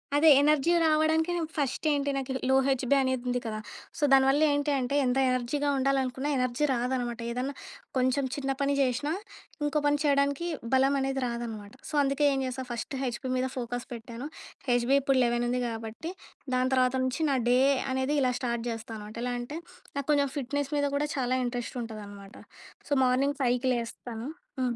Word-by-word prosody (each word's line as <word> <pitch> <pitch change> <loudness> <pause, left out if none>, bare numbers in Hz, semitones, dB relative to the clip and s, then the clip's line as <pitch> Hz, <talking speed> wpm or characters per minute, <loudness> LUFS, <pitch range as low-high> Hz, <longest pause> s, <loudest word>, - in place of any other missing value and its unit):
అదే 310 +2 +6
ఎనర్జీ 300 +2 +3
రావడానికి 315 +2 +3
నాకు 325 -2 -2
ఫస్ట్ 280 +1 -1
ఏంటి, 285 -1 0
నాకు 265 -1 -3 0.2
లో 265 - +5
హెచ్‌బి 265 0 +2
అనేది 260 -2 0
ఉంది 250 0 +1
కదా! 215 -1 -3 0.4
సో, - - -3
దానివల్ల 270 +2 +5
ఏంటి 290 +1 0
అంటే, 255 +2 -1
ఎంత 250 +1 +1
ఎనర్జీగా 255 +4 0
ఉండాలనుకున్నా 265 0 0
ఎనర్జీ 255 +3 +1
రాదనమాట. 245 -1 -1
ఏదన్నా 255 +3 -2 0.4
కొంచెం 260 +2 +2
చిన్న 275 -1 -2
పని 280 0 +2
చేసినా, 260 +3 0 0.5
ఇంకో 295 +1 +1
పని 290 0 +3
చేయడానికి 280 +3 +2 0.3
బలం 270 +1 +4
అనేది 270 0 -1
రాదనమాట. 225 -4 -5 0.2
సో, - - -10
అందుకే 275 +2 +1
ఏం 270 - 0
చేస్తా, 260 0 -4
ఫస్ట్ 240 +4 -4
హెచ్‌బి 255 0 -3
మీద 255 +1 0
ఫోకస్ 245 0 -3
పెట్టాను, 235 +3 -7 0.4
హెచ్‌బి 245 +2 +3
ఇప్పుడు 270 0 +2
11 240 0 +1
ఉంది 250 +1 0
కాబట్టి, 225 +8 -5 0.4
దాని 255 +1 +1
తర్వాత 255 0 +3
నుంచి 260 +5 -1
నా 270 - +2
డే 250 +1 +5 0.3
అనేది 265 +3 0
ఇలా 255 -1 +3
స్టార్ట్ 235 -2 -1
చేస్తా 225 0 -5
అనమాట. 210 0 -9
ఎలా 245 0 -1
అంటే, 285 +6 -6 0.4
నాకు 280 -1 -3
కొంచెం 285 -1 +3
ఫిట్నెస్ 285 +1 -2
మీద 285 - +2
కూడా 295 +1 +1
చాలా 255 -1 +1
ఇంట్రెస్ట్ 245 0 -4
ఉంటదనమాట. 205 -1 -9 0.5
సో, - - +2
మార్నింగ్ 270 +3 +2
5 250 +1 +2
లేస్తాను. 235 +1 -5 0.3
హ్మ్. 245 -2 0
260 Hz, 170 wpm, -28 LUFS, 245-280 Hz, 0.5 s, అదే